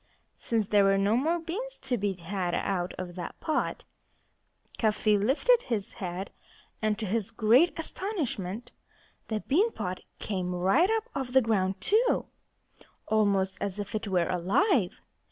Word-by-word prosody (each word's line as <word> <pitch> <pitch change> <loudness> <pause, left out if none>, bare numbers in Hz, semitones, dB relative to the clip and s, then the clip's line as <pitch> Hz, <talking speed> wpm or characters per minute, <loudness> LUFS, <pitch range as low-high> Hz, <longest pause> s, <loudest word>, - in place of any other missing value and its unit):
Since 220 -4 -1
there 205 -1 +5
were 195 0 +4
no 200 +3 +2
more 315 +8 +2
beans 440 +10 -5
to 265 -2 +1
be 205 -3 -1
had 180 0 -3
out 180 -2 -1
of 180 -1 -5
that 175 -1 -7
pot, 315 - -1 1.0
Cuffy 215 -1 +3
lifted 275 - +3
his 220 -2 -2
head. 185 +1 -4 0.5
And 215 -1 +1
to 220 - -3
his 215 +1 -1
great 230 +10 +4
astonishment 255 - -3 0.6
the 215 -1 -2
bean 395 - +2
pot 180 0 -4 0.2
came 180 -3 -3
right 195 - +3
up 445 -1 +1
off 260 -3 -4
the 265 - +7
ground 195 -4 +1
too, 450 - +2 0.8
almost 200 -3 +2
as 200 -1 -2
if 205 -1 -5
it 215 0 -2
were 180 -3 +1
alive. 195 - +1
215 Hz, 150 wpm, -28 LUFS, 190-270 Hz, 1.0 s, the